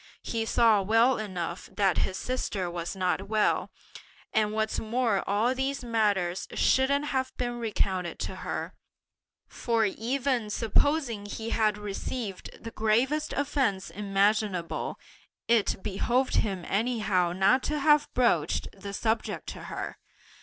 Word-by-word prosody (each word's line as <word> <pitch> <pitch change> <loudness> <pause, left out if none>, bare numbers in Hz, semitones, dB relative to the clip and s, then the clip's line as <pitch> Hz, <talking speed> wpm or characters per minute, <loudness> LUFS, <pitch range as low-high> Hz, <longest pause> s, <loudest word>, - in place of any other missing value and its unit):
He 225 -1 -2
saw 225 -3 +4
well 225 +5 +3
enough 180 -4 -4
that 195 -3 +2
his 190 - -1
sister 200 -8 -2
was 170 +1 -4
not 185 +1 -1
well; 215 0 +1 0.6
and 215 -2 +2
what's 220 0 -1
more 225 -2 0
all 215 +5 +2
these 265 +1 -2
matters 205 -6 0
shouldn't 280 +2 +3
have 260 -2 -1
been 240 -1 -2
recounted 190 -6 -1
to - - -4
her; - - -4 0.7
for 230 -2 0
even 245 +2 -1
supposing 230 0 +1
he 225 +2 -5
had 215 -2 +2
received 210 +1 -5
the 230 - -6
gravest 240 +9 +1
offences 270 -9 0
imaginable, 200 -2 0 0.5
it 225 -4 +2
behoved 245 +6 +1
him 190 -5 -1
anyhow 210 -5 +1
not 195 +8 +3
to 300 - -1
have 295 0 +4
broached 245 -2 +2
the 200 0 -7
subject 220 +1 -1
to - - -8
her! - - -5
220 Hz, 130 wpm, -28 LUFS, 195-245 Hz, 0.7 s, saw